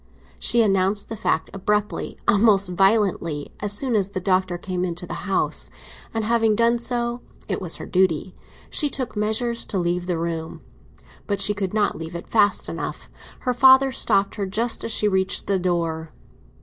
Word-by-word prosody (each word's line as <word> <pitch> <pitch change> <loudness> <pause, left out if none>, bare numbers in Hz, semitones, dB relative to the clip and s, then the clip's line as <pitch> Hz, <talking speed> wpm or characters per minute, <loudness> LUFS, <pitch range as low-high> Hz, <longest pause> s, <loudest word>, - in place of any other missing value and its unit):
She 235 -1 +3
announced 195 0 +1
the 225 - -4
fact 160 -5 -1
abruptly, 210 +2 -2
almost 200 -3 +4
violently, 195 -6 +1
as 205 -1 -2
soon 245 +3 +1
as 200 -2 +1
the 200 -2 -4
Doctor 185 -1 0
came 180 0 -3
into 175 0 -4
the 195 - -6
house; 195 - 0 0.4
and 225 -1 -2
having 225 -1 +2
done 235 +2 +2
so—it 240 0 -4
was 175 -3 -2
her - - -8
duty—she 185 - -1
took 255 -4 -4
measures 220 +3 0
to 200 - -2
leave 175 0 -1
the 175 -2 0
room. 165 -1 -4 0.7
But 200 -2 -1
she 200 +1 +3
could 200 -1 -3
not 210 -5 +1
leave 165 +1 -7
it 170 - -7
fast 210 -2 +2
enough; - - -6 0.3
her 250 - 0
father 265 +2 +6
stopped 200 -6 +3
her 200 -2 -2
just 225 +5 -1
as 230 - -2
she 210 - +2
reached 190 -1 0
the 195 -1 +1
door. 165 -3 -1
200 Hz, 170 wpm, -23 LUFS, 180-225 Hz, 0.7 s, father